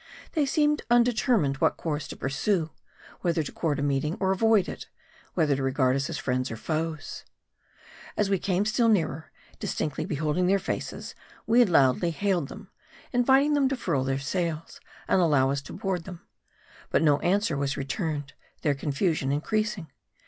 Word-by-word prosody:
They 300 -4 +1
seemed 295 +1 +2
undetermined 235 - +3
what - - +2
course 150 -3 -3
to - - -7
pursue: 160 +4 0 0.5
whether 170 -3 0
to - - -7
court 155 -4 -1
a 140 - -2
meeting, 145 +3 0
or 190 -1 +1
avoid 215 0 +3
it; - - -7 0.5
whether 155 -5 +2
to 135 - -3
regard 130 -1 +2
us 140 0 -1
as - - -3
friends 130 0 -1
or 115 - -5
foes. 155 +4 -4 0.9
As 210 - +2
we 195 -1 +1
came 185 +2 0
still 230 +2 +2
nearer, 160 -7 0 0.3
distinctly 150 +1 -2
beholding 155 +1 0
their 195 +2 +4
faces, - - -5 0.3
we 240 +2 +5
loudly 160 - +3
hailed 175 -2 0
them, 210 -1 -11 0.4
inviting 265 +4 +4
them 280 -2 +3
to 270 - -2
furl 155 - 0
their 135 0 0
sails, 165 +2 -3 0.3
and 185 - +3
allow 140 -5 +3
us 140 0 -1
to - - -10
board 185 -3 -3
them. 180 -3 -9 0.7
But - - +2
no 145 -2 +4
answer 190 -3 +1
was 140 -1 -1
returned; 145 0 -3 0.3
their 145 - +3
confusion 140 0 -1
increasing. 185 +1 -1
165 Hz, 165 wpm, -27 LUFS, 140-205 Hz, 0.9 s, we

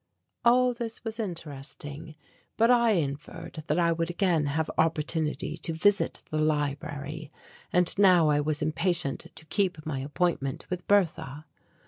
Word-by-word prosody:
All 250 +1 +5
this 235 -2 -6
was 225 0 -4
interesting, 155 -4 -6 0.4
but 230 +2 +5
I 235 -2 +5
inferred 165 +1 -4
that 150 - +1
I 170 -1 +3
would 165 0 -1
again 175 -4 +1
have 155 +2 0
opportunity 155 -1 0
to 165 0 -4
visit 200 +5 +2
the 155 - 0
library 145 0 -2 0.4
and 180 -1 +3
now 180 -5 +6
I 145 0 +3
was 150 0 -1
impatient 165 -1 0
to 155 - -10
keep 165 -1 -1
my 145 -4 -2
appointment 145 0 -1
with 180 -1 -4
Bertha. 160 -7 +1
160 Hz, 140 wpm, -28 LUFS, 150-180 Hz, 0.4 s, now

